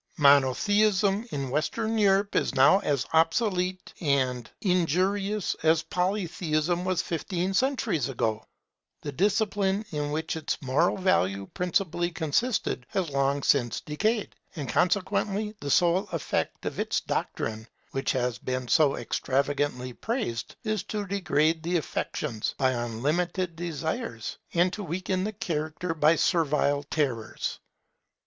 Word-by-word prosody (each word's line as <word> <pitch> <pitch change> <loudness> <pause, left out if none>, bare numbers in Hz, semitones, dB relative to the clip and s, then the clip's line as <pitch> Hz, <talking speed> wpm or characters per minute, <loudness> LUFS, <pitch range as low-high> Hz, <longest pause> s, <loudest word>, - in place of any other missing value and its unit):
Monotheism 195 - +4
in 135 -3 -3
Western 215 - -1
Europe 200 -1 +3
is - - +1
now 135 +9 +6
as 140 -9 0
obsolete 180 +2 +1
and 130 -6 +1
as - - -24
injurious 190 +3 +1
as 160 +1 +3
Polytheism 175 -2 -1
was 185 -2 +1
fifteen 175 +3 -2
centuries 220 - +1
ago. 110 -4 -1 0.6
The 145 - -3
discipline 200 +3 +1
in 150 -2 -2
which 160 +2 -2
its 160 - -2
moral 140 +6 +1
value 100 - +1
principally 175 -1 0
consisted 165 - -1
has 180 -6 -1
long 140 0 +1
since 120 -5 +2
decayed; 215 +9 -1 0.2
and 145 -5 -4
consequently 200 - +1
the 145 - -5
sole 175 +6 +3
effect 165 - -2
of - - -3
its - - 0
doctrine, 110 0 -3 0.2
which 135 - -1
has 125 -4 -1
been 130 0 -3
so 150 -3 +4
extravagantly 140 -2 -1
praised, 120 - -3
is 215 -3 -1
to 210 -1 -3
degrade 165 -5 +1
the 175 +2 0
affections 140 -6 -3
by 130 -1 +3
unlimited 155 +10 -1
desires, 160 -8 -4 0.2
and 175 +2 +3
to 210 - -4
weaken 185 +2 -2
the 215 - -3
character 165 -2 -3
by 155 +1 +4
servile 150 -5 +2
terrors. 130 -8 -2
165 Hz, 125 wpm, -27 LUFS, 140-190 Hz, 0.6 s, now